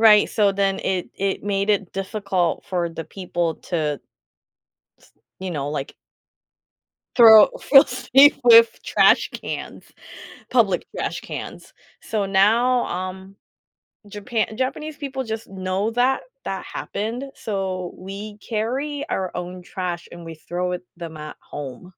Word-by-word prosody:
Right, 215 -2 +7
so 205 -3 +2
then 195 0 0
it 185 -2 -2
it 195 0 -1
made 200 0 0
it 200 -3 0
difficult 195 -3 -1
for 180 -3 -1
the 165 0 -6
people 175 -2 -3
to 150 -5 -1 1.0
t - - -22 0.3
you 185 -1 -5
know, 145 -2 -3
like 145 -2 -4 1.2
throw 220 -4 +9
feel 275 +1 +7
safe 270 +2 +4
with 230 -1 +7
trash - - +4
cans, - - -7 0.7
public - - +2
trash - - -3
cans. - - -8 0.3
So 210 -3 -2
now, 225 +6 +3
um, 185 +2 -6 0.7
Japan 215 +1 -3
Japanese 275 +4 -3
people 270 -3 -4
just 220 -1 -5
know 190 +2 -2
that 255 +3 +2 0.2
that - - -4
happened, 230 +5 -4
so 190 -4 -4
we 200 +3 -8
carry 260 +8 -3
our 185 -1 -2
own 180 +1 -6
trash, 175 -1 -5
and 175 0 -10
we 165 0 -8
throw 180 +3 -4
it 180 - -4
them 165 -2 -8
at 150 0 -8
home. 135 +1 -8
195 Hz, 135 wpm, -22 LUFS, 180-225 Hz, 1.2 s, throw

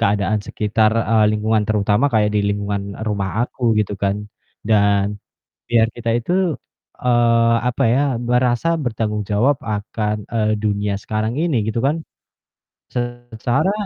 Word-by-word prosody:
keadaan 100 +1 +1
sekitar, 110 0 +1 0.2
eee, 110 -1 +4
lingkungan, 110 0 +1
terutama 105 +3 +2
kayak 105 -1 +3
di 105 - +3
lingkungan 100 0 -2 0.2
rumah 100 -2 -1 0.2
aku 125 - -16 0.2
gitu 105 -1 0
kan. 100 0 +1 0.5
Dan, 100 -2 +3 0.6
biar 115 -1 +4
kita 115 -1 -2
itu, 120 +9 -3 0.7
eee, 115 -1 +3
apa 130 +2 0
ya, 135 - +3 0.2
merasa 125 +4 +1 0.2
bertanggung 105 -2 -1
jawab 125 +7 +3
akan, 105 0 -2 0.2
eee, 110 -1 +2
dunia 100 -1 0
sekarang 110 +2 -2
ini 165 -7 +1
gitu 110 +1 -2
kan. 145 +3 +1 1.0
Secara 120 - -1
110 Hz, 130 wpm, -20 LUFS, 105-120 Hz, 1.0 s, eee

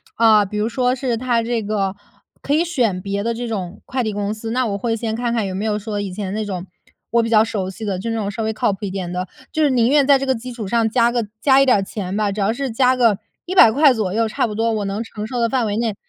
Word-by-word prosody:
啊， 220 -2 +5
比 210 +2 -5
如 210 +1 +1
说 250 +1 +1
是 255 -2 -1
他 235 -1 0
这 230 -1 -1
个 200 -2 -1 0.5
可 285 - 0
以 330 +3 +2
选 240 - 0
别 200 +1 -3
的 230 +2 -1
这 240 +1 -4
种 195 -4 -5
快 255 0 -2
递 220 - -1
公 205 0 -2
司， 220 +1 -6
那 255 +2 0
我 205 -3 -2
会 230 +2 -1
先 225 -1 -3
看 240 0 -1
看 230 -3 0
有 190 - -4
没 190 +3 -3
有 215 -1 0
说 210 -1 -4
以 195 -2 -4
前 190 0 -4
那 215 +1 -2
种 190 -3 -5 0.5
我 235 - +4
比 230 - -2
较 220 -1 +5
熟 205 -4 -3
悉 215 +3 -7
的， 190 -3 -2
就 230 - -4
是 225 - -1
那 - - -1
种 205 -1 -2
稍 225 - -5
微 220 0 0
靠 215 -2 0
谱 - - -9
一 - - -4
点 185 -2 -4
的， 180 +1 -3 0.2
就 315 - -1
是 295 - +4
宁 240 -3 +3
愿 285 -1 +4
在 280 -1 +6
这 270 - -3
个 265 - +2
基 250 +1 -7
础 230 -4 -6
上 230 +1 +1
加 235 +1 +3
个 240 -2 0 0.2
加 270 +1 +5
一 - - +5
点 250 - +5
儿 195 - -1
钱 195 -1 -4
吧， 210 -1 +1
只 205 +1 -3
要 200 +2 +2
是 265 +2 -3
加 255 +2 +3
个 230 -5 +3 0.3
$100 295 -6 +6
左 215 -6 -2
右 225 0 +2
差 220 - 0
不 210 - -6
多 225 +1 +1
我 210 -2 -2
能 200 +3 -3
承 215 -2 -7
受 245 +1 -3
的 230 - +2
范 245 -2 0
围 205 0 -2
内 225 -3 -1
225 Hz, 320 characters per minute, -20 LUFS, 205-240 Hz, 0.5 s, 在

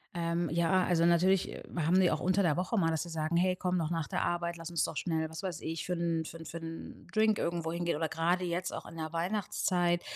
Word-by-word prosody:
Ähm, 170 -1 0
ja, 170 +3 +3
also, 170 -2 +3
natürlich, 180 +2 +4
äh, - - -8
haben 170 +2 +2
sie 185 -2 +5
auch 155 - 0
unter 185 +2 +3
der 165 -5 +3
Woche 185 +5 0
mal, 165 -3 +3
dass 160 +1 0
sie 170 - -9
sagen: 160 +1 -1
„Hey, 180 +1 +3
komm 180 0 0
doch 165 -1 -1
nach 165 -2 -1
der - - -1
Arbeit, 170 0 -1
lass 165 0 -7
uns 170 -2 0
doch - - -2
schnell 160 -2 -1
was 160 +3 -7
weiß 180 -4 -3
ich 160 0 -4
für 180 - -1
'n 170 -1 0
für 165 - -8
'n 165 - -10
für 170 - -6
'n 165 0 -8
Drink 215 -1 +4
irgendwo 170 -1 -1
hingehen.“ 170 -2 -1
Oder 160 - 0
grade 175 +3 +1
jetzt 175 +1 -2
auch - - -6
in 165 - -10
der 160 -1 -4
Weihnachtszeit, 175 -1 +1
170 Hz, 260 wpm, -31 LUFS, 165-180 Hz, -, sie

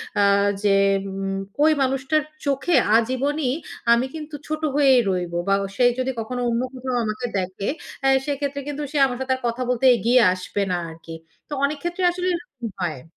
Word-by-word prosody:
অ্যা 200 -1 +4 0.4
যে 200 -1 +4 0.4
উম 195 0 -3 0.2
ঐ 300 - +6 0.2
মানুষটার 270 +3 +1 0.2
চোখে 280 +4 +1 0.2
আজীবনী 260 +4 0 0.4
আমি 240 +2 +2
কিন্তু, 305 -1 -7
ছোট 310 0 -3
হয়েই 270 -3 +5
রইবো। 175 -2 -2
বা 195 - +4 0.2
সে 250 - +1 0.2
যদি 255 +1 0
কখনো 245 +3 -4
অন্য 235 +1 0
কোথাও 255 0 -4
আমাকে 215 +3 -3
দেখে, 185 +1 -3 0.3
অ্যা 270 - +3 0.2
সেক্ষেত্রে 280 -1 -2
কিন্তু 290 0 -4
সে 300 - -2
আমার 250 -2 -3
সাথে 260 0 0
আর 260 - -10
কথা 235 +2 -3
বলতে 250 +1 +1
এগিয়ে 240 +2 +3
আসবে 185 +2 -4
না 180 - +1
আরকি। 165 0 -10 0.3
তো - - -5
অনেক 290 +1 +1
ক্ষেত্রে 345 +2 -2
আসলে 360 +1 -3
এরকম 290 -9 -6
হয়। 155 -7 -3
255 Hz, 180 wpm, -23 LUFS, 205-285 Hz, 0.4 s, ঐ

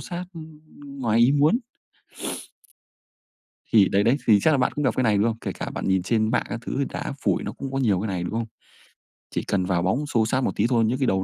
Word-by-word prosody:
xát, 180 +1 -6
ưm, 155 -1 -11 0.4
ngoài 115 -3 +1
ý 125 +4 +5
muốn. 150 +10 +4 2.2
Thì 100 -4 +6
đấy 100 +1 +2
đấy, 120 +5 +3
thì 105 -2 +6
chắc - - +4
là 145 - +3
bạn 125 - +1
cũng 150 - -1
gặp 130 - +1
cái 130 - +1
này, 105 -3 +3
đúng 105 - +2
không? 115 - -2
Kể - - -3
cả - - -5
bạn - - -4
nhìn 95 -1 +2
trên 110 +1 +1
mạng - - +1
các 115 - -4
thứ - - -3
thì 140 - +1
đá - - -4
phủi - - +1
nó - - -4
cũng 135 -1 -7
có 135 - -2
nhiều 105 -8 +2
cái 110 - -2
này, 90 -3 -2
đúng 90 - -4
không? 115 0 -1 0.9
Chỉ - - -2
cần 95 -2 0
vào 90 -2 0
bóng 130 +11 0
xô 115 -6 +1
xát 130 +4 0
một - - +1
tí - - +1
thôi, 115 -3 +3
những 125 +4 0
cái 130 - +1
đầu 95 -3 +1
115 Hz, 260 wpm, -24 LUFS, 100-135 Hz, 2.2 s, Thì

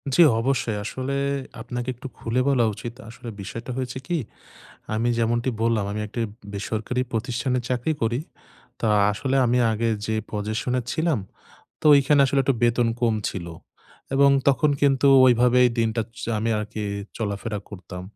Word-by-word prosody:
জ্বি 175 - +8 0.2
অবশ্যই। 120 -3 0
আসলে 130 +5 -3 0.5
আপনাকে 120 +1 -5
একটু 125 - -8
খুলে 120 +2 0
বলা 125 -4 +3
উচিত। 120 +3 -7 0.2
আসলে 115 +1 -9
বিষয়টা 115 +6 -6
হয়েছে 130 0 -3
কি? 175 -1 0 0.8
আমি 115 +2 +1
যেমনটি 120 +2 +1
বললাম, 115 -3 +2
"আমি 105 - -3
একটি 115 +3 -5 0.3
বেসরকারি 110 +5 -2
প্রতিষ্ঠানে 125 +2 -1
চাকরি 125 +5 0
করি।" 120 +3 +1 0.6
তা 115 - +1 0.2
আসলে 130 +6 -1
আমি 120 +1 +2
আগে 115 +1 0 0.2
যে 110 - -1 0.2
পজেশনে 110 +4 -1
ছিলাম 160 -5 +1 0.6
তো - - -1
ওইখানে 140 +1 +4
আসলে 135 +1 +2
একটু 135 - +2
বেতন 120 0 +3
কম 115 -2 +2
ছিল। 85 -3 -6 0.7
এবং 140 0 +6 0.2
তখন 150 +2 +3
কিন্তু 140 -1 +4 0.2
ওইভাবেই 125 0 +5
দিনটা 115 0 +1 0.2
চা 115 - -3
আমি 115 +2 0
আরকি 105 0 -5 0.3
চলাফেরা 105 0 -3
করতাম। 90 -2 -8
120 Hz, 150 wpm, -24 LUFS, 110-130 Hz, 0.8 s, জ্বি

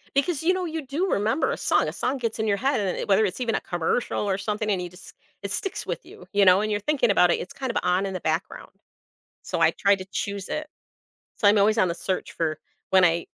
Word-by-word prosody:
Because 305 +2 +1
you 365 - +4
know, 370 -1 -2
you 320 -3 -4
do 310 +9 -1
remember 220 +9 +1
a - - -2
song - - +2
a - - -4
song 260 +3 -1
gets 230 -3 -3
in 220 - 0
your 200 -1 +2
head, 265 +3 +1
and 190 -3 -1
it - - -4
whether 205 +1 +4
it's 190 - -3
even 230 -2 0
a - - -1
commercial 175 +7 -1
or 190 - +1
something, 210 +2 -2
and 190 -3 +1
you 180 - -5
just 180 +1 -14 0.3
it - - -4
sticks 390 -2 -3
with - - -4
you - - -13
you 200 0 +4
know, 185 +1 +7
and 215 - -1
you're 205 - 0
thinking 265 -1 +1
about 180 -3 +5
it - - +1
it's - - -7
kinda 260 -4 -4
on 180 +2 +2
in 195 - -4
the 185 - -3
background, 160 +4 -3 0.8
so, - - -2
I - - +5
try 200 0 +3
to 185 -1 -7
choose 200 0 -4
it. 305 0 -4 0.7
So, 205 - +2
I'm 205 +1 +5
always 215 +2 +3
on 185 -4 +3
the - - 0
search 185 +2 -3
for 155 -2 -2 0.3
when 190 -1 +6
I 170 0 +1
205 Hz, 260 wpm, -25 LUFS, 185-260 Hz, 0.8 s, know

